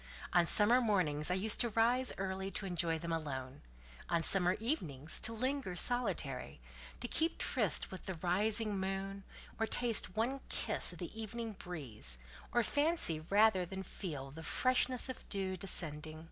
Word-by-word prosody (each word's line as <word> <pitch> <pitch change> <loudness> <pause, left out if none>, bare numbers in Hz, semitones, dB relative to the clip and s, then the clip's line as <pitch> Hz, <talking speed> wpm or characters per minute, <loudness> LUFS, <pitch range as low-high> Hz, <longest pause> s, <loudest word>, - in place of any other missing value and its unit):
On 175 -1 +4
summer 230 +7 +5
mornings 180 -10 0
I 180 - +1
used 205 +3 +3
to 240 - +1
rise 240 +4 +2
early, 190 0 -3
to 195 - -3
enjoy 170 -3 -1
them 170 +1 -5
alone; 135 -4 -5 0.5
on 170 -1 +1
summer 180 -1 +7
evenings, 160 - +1
to 225 - +4
linger 255 -3 -2
solitary, 175 - +1 0.4
to 240 - -2
keep 325 +6 -1
tryste - - -1
with 190 - -9
the 190 - -3
rising 205 +4 0
moon, 195 +1 -4 0.4
or 225 - 0
taste 230 -7 -1
one 245 +5 -1
kiss - - +2
of - - -10
the 225 - -7
evening 225 +1 -5
breeze, 130 - -3 0.3
or 240 - +2
fancy 290 - +3
rather 195 +3 +3
than 190 +2 -6
feel 145 -8 -6
the 160 +3 -10
freshness 255 +7 +1
of 260 - -8
dew 190 -2 -1
descending. 155 -5 -4
195 Hz, 160 wpm, -34 LUFS, 165-225 Hz, 0.5 s, summer